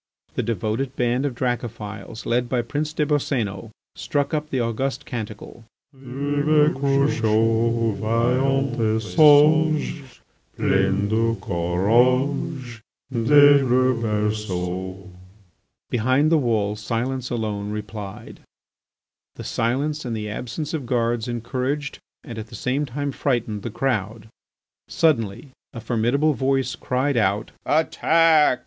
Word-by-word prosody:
The - - -1
devoted 115 +4 -2
band 125 +3 0
of 130 - -5
Dracophils, 115 -3 -4
led 120 +1 0
by 125 -2 0
Prince 150 +5 -3
des 155 -1 0
Boscénos, 120 -8 -1 0.3
struck 145 +1 -2
up 150 0 -2
the 130 - -1
august 130 +3 -2
canticle: 110 -1 -7 0.3
Vive 145 +3 +1
Crucho, 115 -4 +1
Vaillant 125 +6 +1
et 110 -1 +1
sage, 155 +4 +4 0.6
Plein 95 +1 +1
de 115 +2 +1
courage 120 - 0 0.3
Des 145 +4 +6
le 130 0 +3
berceau! 95 -4 -3 0.8
Behind 130 +6 +2
the 160 - +5
wall 110 -5 0
silence 120 +4 -3
alone 105 -4 -3
replied. 105 -1 -7 1.0
This - - -7
silence 140 +6 -1
and 115 -3 -3
the 105 -1 -4
absence 145 +8 -5
of 145 -6 -4
guards 120 -1 0
encouraged 130 +5 -3 0.2
and 115 -5 -7
at 110 - -7
the - - -11
same 140 +3 -1
time 140 +3 -3
frightened 120 -7 -1
the 120 - -5
crowd. 110 -3 -2 0.6
Suddenly 130 -5 0 0.2
a 115 - -6
formidable 120 +7 +1
voice 135 0 0
cried 130 +1 -1
out: 105 0 0 0.2
"Attack!" 160 -2 +3
120 Hz, 115 wpm, -23 LUFS, 110-140 Hz, 1.0 s, Des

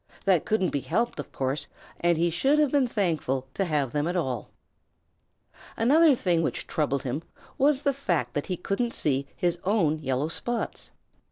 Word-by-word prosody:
That 185 -5 +3
couldn't 215 -4 +1
be 140 - 0
helped, 195 - -1
of 145 - -6
course, 135 +2 -2 0.3
and 170 -1 +2
he 170 +1 +2
should 270 - +2
have 300 -3 +3
been 280 -3 +3
thankful 160 - -1
to 195 - 0
have 145 -6 0
them 150 +3 0
at 175 - -2
all. 130 - -2 1.3
Another 290 +5 +5
thing 175 -7 +1
which - - -2
troubled 140 -3 -1
him 135 +4 -2 0.4
was 280 0 +3
the 280 - +2
fact 170 - -1
that 145 - -2
he 180 - -2
couldn't 235 +7 -1
see 140 -2 +1
his 175 -1 0
own 175 -6 +2
yellow 135 0 -1
spots. 240 +7 -3
175 Hz, 175 wpm, -27 LUFS, 145-230 Hz, 1.3 s, Another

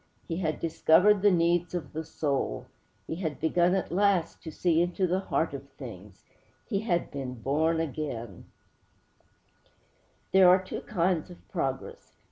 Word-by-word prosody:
He 165 - -3
had 160 -4 -2
discovered 180 +5 +4
the 205 - +6
need 175 0 +2
of 175 - -5
the 160 +1 -3
soul. 140 - -2 0.4
He 160 - -5
had 160 -5 -3
begun 175 +3 +2
at 190 - -2
last 185 -2 +1
to 160 - -7
see 165 +1 +2
into 175 +2 0
the 180 +1 +1
heart 195 - -1
of - - -8
things.' - - -11 0.4
He 200 -5 0
had 185 -5 -1
been 130 -3 -5
born 155 +7 0
again! 135 - -5 1.9
There 190 -1 +7
are 185 +1 +6
two - - -6
kinds 180 -4 0
of 175 - -14
progress. 135 -8 -4
170 Hz, 150 wpm, -28 LUFS, 155-185 Hz, 1.9 s, There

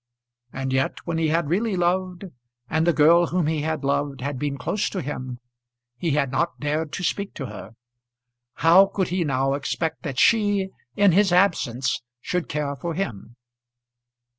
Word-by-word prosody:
And 130 0 -3
yet 130 0 0
when 165 -1 -2
he 160 - +2
had 160 0 +1
really 200 +6 0
loved, 180 +1 0 0.4
and 160 +5 0
the - - +6
girl 165 +2 +5
whom 180 -1 0
he 155 -1 0
had 155 -1 -2
loved 140 0 -1
had 140 0 -3
been 145 -1 -2
close 195 +11 -1
to 195 - -4
him, 130 -4 -5 0.6
he 165 +6 -2
had 140 -3 +1
not 170 +5 -1
dared 150 +1 -2
to 180 - -4
speak 200 +3 -2
to 135 - -5
her! 115 -2 -9 0.9
How 185 +4 +8
could 190 -2 -2
he 180 0 0
now 135 -2 0
expect 145 +3 -2
that 140 -5 -5
she, 205 - +3 0.3
in 200 -2 +5
his 195 +2 +3
absence, 165 -9 +1 0.2
should 180 +6 -3
care 145 -1 -2
for 165 +5 -4
him? 120 - -5
160 Hz, 170 wpm, -24 LUFS, 140-180 Hz, 0.9 s, How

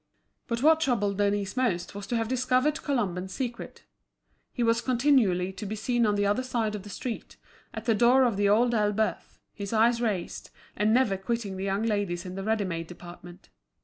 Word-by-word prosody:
But 235 -1 -2
what 320 +1 +6
troubled 205 -9 0
Denise 205 0 0
most 235 -10 -1
was 200 0 -7
to 240 - -2
have 225 -1 0
discovered 255 +5 +1
Colomban's 190 - -2
secret. 245 -3 -5 0.7
He 245 - -2
was 230 0 +2
continually 235 -9 +2
to 190 +3 -7
be 215 - -4
seen 235 +1 +1
on 205 - +1
the 205 0 +1
other 205 +5 +1
side 235 -4 -2
of 210 - -5
the 205 - -11
street, 230 +3 -6 0.3
at - - -7
the 230 - +3
door 245 +5 +5
of 240 -5 +2
The 200 0 +2
Old 235 +4 +3
Elbeuf, 215 0 -1
his 200 0 -6
eyes 230 +2 +3
raised, 205 -7 -3 0.3
and 210 +2 +2
never 230 -5 +3
quitting 205 0 -3
the 190 +1 -4
young 195 +2 -1
ladies 205 -5 -1
in 180 - -6
the 195 - -5
ready 220 -1 0
made 165 -2 -4
department. 175 0 -12
215 Hz, 195 wpm, -27 LUFS, 195-240 Hz, 0.7 s, what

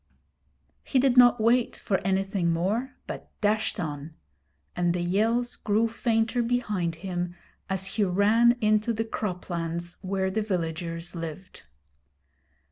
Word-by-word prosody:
He 270 - 0
did 260 -1 +4
not 245 -1 +7
wait 235 +2 +2
for 190 - 0
anything 195 -2 0
more, 210 +11 -1
but - - -7
dashed 215 +1 0
on; 155 -1 -5 0.6
and 175 0 +1
the 180 - -1
yells 225 +7 +1
grew 215 +2 +1
fainter 225 +1 0
behind 210 -8 -1
him 175 0 -4 0.3
as 190 0 -1
he 205 +2 0
ran 210 +6 +4
into 215 +2 +2
the 225 +1 -2
croplands 175 -5 -4
where 190 0 -1
the 220 +3 0
villagers 165 -3 -3
lived. 165 +2 -7
195 Hz, 125 wpm, -27 LUFS, 175-225 Hz, 0.6 s, not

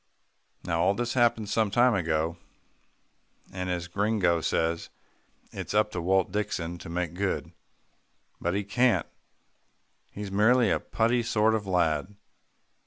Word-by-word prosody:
Now 85 -1 -1
all 95 +3 +3
this 120 +1 -2
happened 120 -4 +2
some 110 0 +1
time 120 +4 +4
ago, 80 -3 0 1.2
and 90 -1 -4
as 90 -1 -2
Gringo 95 -3 +1
says, 80 +1 -1 0.6
"It's - - -5
up 105 0 +3
to 90 - -3
Walt 95 +1 +1
Dixon 85 -4 -3
to - - -9
make 85 -1 -2
good." 95 +2 -2 0.9
But 85 +2 -1
he 100 - 0
can't. 120 +5 +2 1.0
He's 100 -1 -7
merely 110 +2 +4
a - - +2
putty 115 +2 +1
sort 110 -1 +2
of 105 -3 -2
lad. 90 0 0
100 Hz, 135 wpm, -27 LUFS, 85-110 Hz, 1.2 s, time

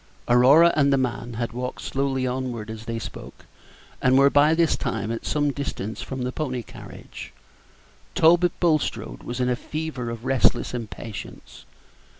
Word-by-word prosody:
Aurora 140 +8 +6
and 140 -2 +3
the 135 - +4
man 125 -2 -2
had 115 0 -3
walked 125 +1 -5
slowly 135 -1 -1
onward 125 -4 -3
as 110 0 -9
they 115 0 -3
spoke, 115 - -9 0.6
and 130 +1 +4
were 140 +1 +6
by 150 +2 +5
this 165 -1 +3
time 110 0 -3
at 115 - -5
some 145 -1 +1
distance 110 -7 -5
from 130 -1 -5
the 125 - -2
pony 130 -4 -3
carriage. - - -11 0.8
Talbot 175 +2 +4
Bulstrode 155 - 0
was 120 +1 -6
in 125 - +1
a 125 - +1
fever 150 -3 -5
of 115 +1 -7
restless 130 -2 +2
impatience. 115 -3 -8
130 Hz, 155 wpm, -24 LUFS, 115-145 Hz, 0.8 s, Aurora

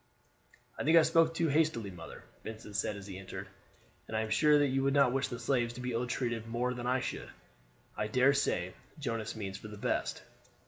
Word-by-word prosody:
"I - - -1
think 160 +3 +6
I 165 - +8
spoke 165 0 +4
too 165 0 +2
hastily, 145 -9 +1
mother," 90 - -10 0.2
Vincent 110 -2 -8
said 105 +1 0
as 100 -1 -8
he 95 -2 -7
entered; 95 0 -7 0.6
"and 110 - -2
I - - +2
am 110 -1 -3
sure 150 +6 +5
that 145 -1 +3
you 135 +1 +1
would 135 +1 +2
not 140 -3 +5
wish 135 0 +1
the 120 - -5
slaves 120 -1 0
to - - -8
be 125 0 -3
ill 120 +1 -1
treated 120 -2 -2
more 120 +2 0
than 125 0 -4
I 130 +1 +2
should. - - -4 0.7
I 105 - -1
dare 130 +5 +4
say 95 -10 0 0.2
Jonas 115 -6 -3
means 100 -2 -5
for - - -9
the 105 0 -9
best." - - -1
120 Hz, 220 wpm, -32 LUFS, 105-140 Hz, 0.7 s, I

